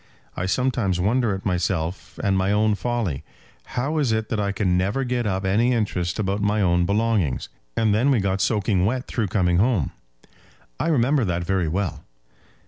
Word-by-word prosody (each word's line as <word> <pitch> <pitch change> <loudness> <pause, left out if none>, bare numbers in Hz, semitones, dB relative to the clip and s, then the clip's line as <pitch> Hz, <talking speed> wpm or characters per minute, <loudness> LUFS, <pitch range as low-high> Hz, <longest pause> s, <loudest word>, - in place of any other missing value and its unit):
I 95 - -2
sometimes 110 -5 0
wonder 110 +2 +1
at 95 - -8
myself 90 -2 -2
and 100 -2 +2
my 95 +1 +1
own 105 +1 +3
folly. 105 - -2 0.5
How 145 +6 0
is 135 -6 +1
it 110 -1 -1
that 110 - -1
I 100 -1 0
can 95 -2 0
never 100 +9 0
get 125 -2 -1
up 95 -1 -1
any 115 +6 +2
interest 95 -7 -1
about 100 -1 -1
my 105 +1 +1
own 90 -3 +2
belongings? 105 - 0 0.3
And 110 -2 +3
then 120 +7 +2
we 130 -4 +3
got 95 -1 0
soaking 105 -4 +1
wet 130 +3 -1
through 115 -5 -2
coming 90 -2 +1
home." 105 - +2 0.9
"I - - 0
remember 140 -2 +2
that 90 -2 -1
very 95 -1 0
well." 90 +3 -2
100 Hz, 180 wpm, -23 LUFS, 95-115 Hz, 0.9 s, own